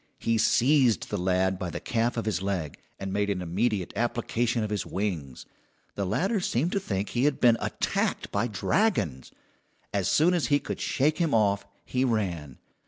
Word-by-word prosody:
He 115 -1 0
seized 125 +1 +3
the - - 0
lad 95 +1 +1
by 90 -3 -3
the - - -5
calf 120 +1 -1
of 115 - -2
his 100 -5 -1
leg, 95 -7 -3 0.2
and 95 -1 -5
made 100 0 0
an 100 -2 -1
immediate 95 +2 -1
application 120 +1 0
of 105 - -3
his 105 - -1
wings. 85 -10 -4 0.5
The 100 -2 -2
latter 190 - +1
seemed 165 -1 0
to 200 - +1
think 100 - -3
he 125 +2 0
had 145 -2 +1
been 120 -2 +6
attacked - - -1
by 105 +4 0
dragons. 105 - 0 0.6
As 100 -3 0
soon 170 +4 +4
as 175 -4 +1
he 145 - +4
could 145 - -5
shake 150 +5 +1
him 165 -7 +2
off 100 -2 +2 0.2
he 130 0 0
ran. 90 - -1
105 Hz, 180 wpm, -27 LUFS, 95-125 Hz, 0.6 s, been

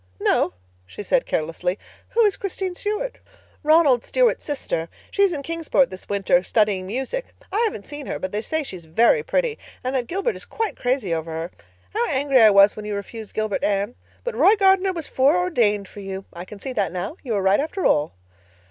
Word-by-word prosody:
"No," - - +2 0.3
she 150 - -8
said - - +1
carelessly. 165 +4 -1 0.4
"Who 470 - +5
is 405 -1 +2
Christine 380 -2 -3
Stuart?" 425 +7 -3 0.4
"Ronald 300 -6 +4
Stuart's - - +2
sister. 170 - -3 0.2
She's 400 -2 +3
in 290 -4 -4
Kingsport 325 -5 +1
this 185 - -9
winter 195 -3 +3
studying 195 -1 +1
music. 265 - -4 0.2
I 405 - 0
haven't 300 - -3
seen 290 -1 -7
her, - - -3
but 185 - -4
they 210 - -1
say 315 +6 -1
she's 185 - -8
very 230 - +4
pretty 485 0 -1 0.2
and 255 +1 -2
that 245 -2 0
Gilbert 395 +7 -1
is - - -7
quite 450 -2 -3
crazy 245 -8 0
over 165 0 -3
her. 165 +2 -4 0.4
How 240 - +1
angry 270 -2 +3
I 220 - +9
was 200 0 +6
when 215 - -7
you 210 -1 -3
refused 215 +2 -7
Gilbert, 215 -2 -1
Anne. 205 +3 0 0.3
But - - -3
Roy 415 - +5
Gardner 385 -2 +4
was 335 -4 -5
foreordained 260 - +2
for 205 - -12
you. 195 -1 -6
I 175 +1 -7
can 200 +2 -11
see 260 +5 -5
that 205 -5 0
now. 180 - -4
You 245 -5 -3
were 200 -2 0
right, 195 +1 +4
after 320 +6 -2
all." 150 - +2
245 Hz, 200 wpm, -23 LUFS, -, 0.4 s, I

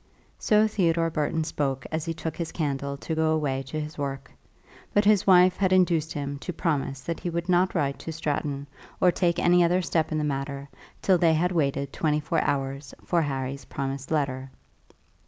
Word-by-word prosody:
So 215 0 +4
Theodore 170 -5 +1
Burton 155 +1 0
spoke 140 -5 -2
as 160 -1 -2
he 165 - -2
took 160 -1 -4
his 170 -2 -4
candle 140 -3 -2
to 160 - -4
go 160 0 +1
away 140 -4 0
to 155 - -4
his 150 0 -6
work; 135 -1 -4 0.6
but 205 0 +4
his 210 -2 +4
wife 185 -1 +6
had 190 -2 +1
induced 170 -4 +3
him 140 -1 -4
to 180 - -5
promise 140 -5 -2
that 165 +5 -4
he 175 - -3
would 170 +1 -3
not 180 +1 +2
write 140 -4 0
to 165 - -6
Stratton 145 -3 -2 0.3
or 180 - +5
take 170 -1 +1
any 175 0 +4
other 180 +2 +2
step 160 -2 0
in 155 - 0
the 155 - 0
matter 140 -1 -3 0.4
till 185 -2 +4
they 165 -2 +4
had 175 +3 +1
waited 140 -4 0
twenty 150 -2 +1
four 155 +2 0
hours 135 0 -2
for 170 -2 +2
Harry's 135 -2 -3
promised 135 0 -4
letter. 135 -4 -1
155 Hz, 190 wpm, -26 LUFS, 140-170 Hz, 0.6 s, wife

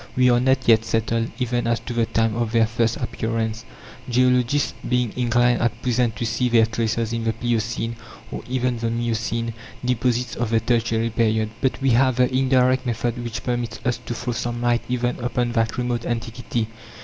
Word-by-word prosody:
We 125 -1 +5
are 120 - +4
not 130 +1 +1
yet 115 -1 +6
settled 115 0 0
even 120 -1 -1
as 115 -1 +1
to 120 - -6
the 115 -1 +1
time 115 -1 +1
of 120 -1 -1
their 115 -1 +5
first 115 0 0
appearance, 115 0 -2 0.4
geologists 125 +2 +2 0.2
being 125 -3 +1
inclined 120 0 +2
at 115 -1 0
present 120 -2 +1
to 120 - -3
see 115 +2 0
their 115 -2 +5
traces 115 0 -1
in 115 -1 -2
the 115 0 0
pliocene, 115 0 -2 0.3
or - - -5
even 125 -2 0
the 115 0 -1
miocene, 115 0 -1 0.3
deposits 125 0 0
of 120 -2 -2
the 115 0 +3
Tertiary 115 0 0
period. 110 -1 +1
But 130 - 0
we 135 - +4
have 130 +1 +4
the 125 0 +2
indirect 130 -1 +3
method 120 0 -2
which 115 -1 -5
permits 120 -2 -2
us 125 -1 +1
to 120 - -3
throw 120 +2 -3
some 120 +1 -3
light 120 0 +2
even 125 0 -1
upon 120 0 -1
that 115 -1 0
remote 120 -1 -1
antiquity. 115 -1 -2
120 Hz, 185 wpm, -23 LUFS, 115-125 Hz, 0.4 s, yet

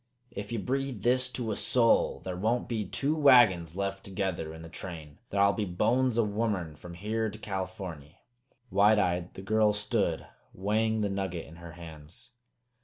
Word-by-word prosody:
Ef 100 +2 -5
ye 115 - -1
breathe 130 -1 -2
this 130 +1 +2
to 120 -3 -3
a - - -1
soul, 115 +2 +2
thar 90 -1 -5
won't 110 +6 0
be 110 -5 -2
two 140 +10 0
wagons 115 - +5
left 95 0 -3
together 95 -5 -3
in 80 +1 -10
the - - -8
train. 80 -3 -8
Thar'll 100 0 +3
be 110 - -1
bones 115 +7 +1
o' 115 - +4
womern 100 -7 -2
from 85 +3 -10
here 110 +4 -1
to 105 - -9
Californy!" 95 -6 -6 0.5
Wide 105 +2 +5
eyed, 90 -3 0
the 95 - -8
girl 110 +1 +3
stood, 105 -5 -1 0.3
weighing 110 +3 +1
the 105 - 0
nugget 95 -4 -3
in 80 - -13
her 85 -1 -10
hands. 80 -1 -12
100 Hz, 175 wpm, -29 LUFS, 90-110 Hz, 0.5 s, wagons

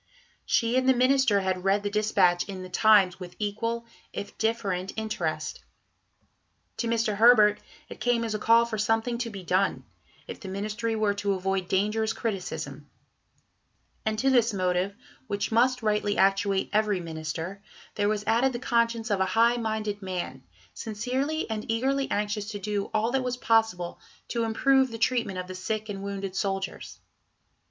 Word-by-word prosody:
She 230 +1 +2
and 260 0 +1
the 260 - +5
Minister 255 -5 +3
had 185 -1 -1
read 195 +1 +2
the 205 - -1
dispatch 200 -4 +2
in 190 -2 -6
the 185 - -9
Times 190 -2 +4
with 180 -1 -9
equal, 230 +3 -2 0.3
if 200 - -6
different, 200 -5 -1
interest. 165 -9 -3 1.1
To 235 - -1
Mr. 225 -3 0
Herbert 215 -2 +6 0.3
it - - -10
came 245 -1 +1
as 225 -2 -2
a 215 - -2
call 230 +2 +5
for 220 -2 -4
something 225 +3 0
to 240 -1 -2
be 195 -4 -8
done, 185 +3 0 0.4
if - - -8
the 195 - -9
Ministry 215 +4 -2
were 215 -2 +1
to 200 0 -1
avoid 190 -1 -1
dangerous 210 +4 +1
criticism; 160 - -4 1.1
and 215 0 -1
to 270 +4 +2
this 235 -4 +3
motive, 185 +1 0 0.3
which 205 0 -2
must 245 +2 +3
rightly 210 -1 +1
actuate 195 0 +2
every 210 -2 +2
Minister, 165 +3 -5 0.3
there 205 0 +1
was 210 -1 -1
added 235 +4 +2
the - - -2
conscience 235 -2 0
of 200 - +1
a 190 - +3
high 235 +1 +5
minded 215 -2 -2
man, 180 -9 -4 0.3
sincerely 255 +8 -2
and 220 -1 -4
eagerly 270 +4 0
anxious 210 0 -2
to 210 - -4
do 205 0 -2
all 220 +2 +1
that 265 0 +1
was 250 0 -2
possible 225 -8 +1 0.3
to 235 -1 0
improve 265 +4 +3
the 230 - -6
treatment 230 -5 0
of 180 - -3
the 185 - -8
sick 215 +4 -3
and 195 -1 -5
wounded 195 -1 -5
soldiers. 195 -1 -3
210 Hz, 165 wpm, -27 LUFS, 195-230 Hz, 1.1 s, Herbert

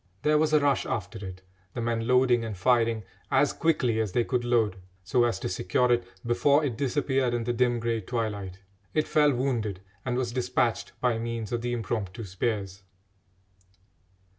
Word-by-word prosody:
There 150 0 +4
was 155 0 +2
a 155 - +5
rush 145 -2 +1
after 105 0 -4
it, 95 -1 -8 0.3
the - - -3
men 115 -1 -1
loading 125 -2 +4
and 110 -4 -5
firing 115 +1 +2 0.3
as - - +3
quickly 125 -9 +1
as 105 -5 -1
they 120 - +3
could 125 0 -1
load, 115 -5 +2 0.3
so 120 +5 +2
as 115 -5 0
to - - -2
secure 95 +7 +1
it 120 0 +3 0.2
before 140 +5 +3
it 130 -5 -2
disappeared 135 -1 0
in 120 - -1
the 120 +1 -1
dim 120 0 +2
grey 115 -1 -1
twilight. 100 -4 -4 0.3
It 155 - +2
fell 150 -1 +4
wounded, 120 -7 -1 0.2
and 125 -1 -1
was 125 -2 -1
despatched 125 -1 0
by 120 -2 +1
means 115 -2 -4
of 120 -1 -1
the 120 0 -2
impromptu 115 -2 -3
spears. 100 0 -3
120 Hz, 175 wpm, -27 LUFS, 110-125 Hz, 0.3 s, a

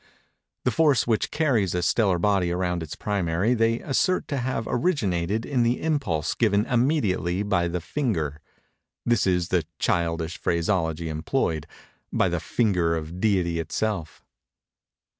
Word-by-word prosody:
The 125 - +3
force 140 -1 +3
which 115 -2 +1
carries 120 - +1
a 90 - 0
stellar 100 -2 +2
body 95 -1 +1
around 90 -1 -1
its 80 -2 -6
primary 100 +2 0
they 115 0 +1
assert 180 +6 +1
to 140 - -1
have 125 -3 -2
originated 110 - 0
in 135 -3 -1
an 120 +1 +2
impulse 125 - -1
given 105 -2 +2
immediately 115 - +1
by 90 -4 +1
the 85 0 -3
finger—this 100 - -3
is 90 -1 +1
the 90 -3 +2
childish 85 -1 -1
phraseology 85 -2 0
employed—by 80 - -2
the - - -1
finger 90 -8 +1
of 80 +2 -5
Deity 90 -5 +1
itself. 85 +1 -3
95 Hz, 130 wpm, -25 LUFS, 85-120 Hz, -, The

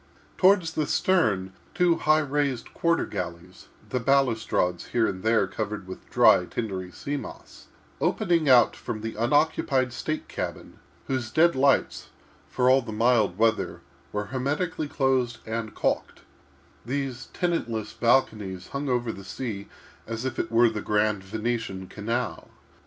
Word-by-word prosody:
Toward 195 0 +5
the 160 -2 -2
stern, 105 - +1 0.2
two 175 0 +4
high 155 +1 +3
raised 140 -3 -1
quarter 170 0 +1
galleries—the 90 +7 -6
balustrades 115 -9 +1
here 120 -2 +1
and 95 -3 -3
there 110 +2 +3
covered 105 -2 -4
with 95 - -10
dry, 90 - +5
tindery 95 -4 -4
sea 145 +10 -4
moss—opening 170 +3 -3
out 125 -2 +6
from 110 - -5
the 115 0 -4
unoccupied 130 +1 +1
state 155 +5 -3
cabin, - - -6 0.3
whose 130 -4 -2
dead 170 +5 +4
lights, 135 0 +2 0.4
for 125 - +1
all 130 +1 +6
the 115 -2 -7
mild 110 -4 +2
weather, 115 0 +1 0.3
were 105 0 -2
hermetically 145 +4 -1
closed 130 -4 +1
and 110 -1 -4
calked—these 130 0 -5
tenantless 120 - -2
balconies 105 -7 +1
hung 140 0 -3
over 120 -2 0
the 100 - -10
sea 100 -1 -5 0.4
as 115 +2 -4
if 130 - -3
it 110 - -2
were 120 +1 +5
the 105 -1 -4
grand 105 -1 +1
Venetian 110 -2 -3
canal. 110 +5 -4
120 Hz, 135 wpm, -26 LUFS, 105-140 Hz, 0.4 s, out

